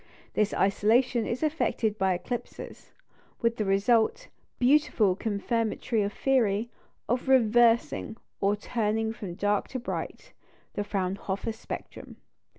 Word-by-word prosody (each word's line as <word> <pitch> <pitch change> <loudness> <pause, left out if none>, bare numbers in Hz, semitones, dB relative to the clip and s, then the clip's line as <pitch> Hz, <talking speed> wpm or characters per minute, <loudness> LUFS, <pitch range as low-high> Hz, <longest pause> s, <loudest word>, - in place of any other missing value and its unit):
This 210 -1 +1
isolation 225 +5 +2
is 245 +6 -3
effected 235 -8 0
by 190 -1 +2
eclipses, 240 +7 -7 0.5
with 230 0 +2
the 215 - -1
result 220 - +2 0.3
beautifully 250 -7 +3
confirmatory 225 +1 -1
of 200 0 -1
theory 230 -3 +1 0.4
of 245 +3 -1
reversing, 235 -2 +3 0.2
or 200 +1 +2
turning 220 0 -1
from 195 -6 -7
dark 205 +1 0
to 260 - -5
bright, 250 - -6 0.4
the 205 - -2
Fraunhofer 195 +1 -2
spectrum. 220 - -8
220 Hz, 115 wpm, -28 LUFS, 205-240 Hz, 0.5 s, beautifully